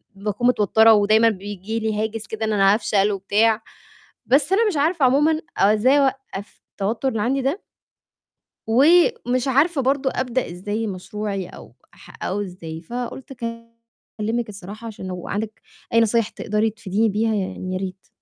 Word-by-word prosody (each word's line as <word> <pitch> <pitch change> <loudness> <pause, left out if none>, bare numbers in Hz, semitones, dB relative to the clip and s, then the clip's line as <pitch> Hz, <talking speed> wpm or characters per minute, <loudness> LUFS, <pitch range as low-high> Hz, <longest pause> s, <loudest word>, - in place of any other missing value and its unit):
باكون 210 +4 -1
متوتّرة، 220 -1 +5
ودايمًا 215 +2 +4
بييجي 205 +1 -5
لي 220 -1 -1
هاجِس 220 0 -4
كده، 220 0 -3
إن 215 - 0
أنا 195 -1 +5
هافشل 210 -2 +1
وبتاع، 210 +3 +2 0.7
بس 280 +7 +3
أنا 445 +3 +4
مش 380 -7 -1
عارفة 305 0 +2
عمومًا 295 +5 +3 0.2
أو 195 - +4
إزاي 255 +7 +4
أوقّف 265 -7 -3
التوتُّر 220 +6 -2
اللي 225 -4 -2
عندي 265 +5 0
ده. 275 +10 -2 1.0
ومش 280 - +3
عارفة 280 +3 +2
برضه 265 +1 +1
أبدأ 255 -4 -2
إزاي 205 +5 -3
مشروعي، 195 0 -4
أو - - -13 0.2
ح - - -13
أو 200 +2 -1
إزاي، 170 -4 -7
فقُلت 245 +7 -6
أكلِّمِك 230 -1 -6
الصراحة، 205 +3 -9
عشان 205 -4 -8
لو 180 -1 -6
عندِك 215 +1 -4 0.3
أي 230 - +6
نصايح 230 0 +2
تقدري 215 0 -1
تفيديني 220 0 -1
بيها، 220 +2 0
يعني 185 -2 -3
يا 185 - -1
ريت. 190 0 -6
220 Hz, 155 wpm, -22 LUFS, 205-255 Hz, 1.0 s, أي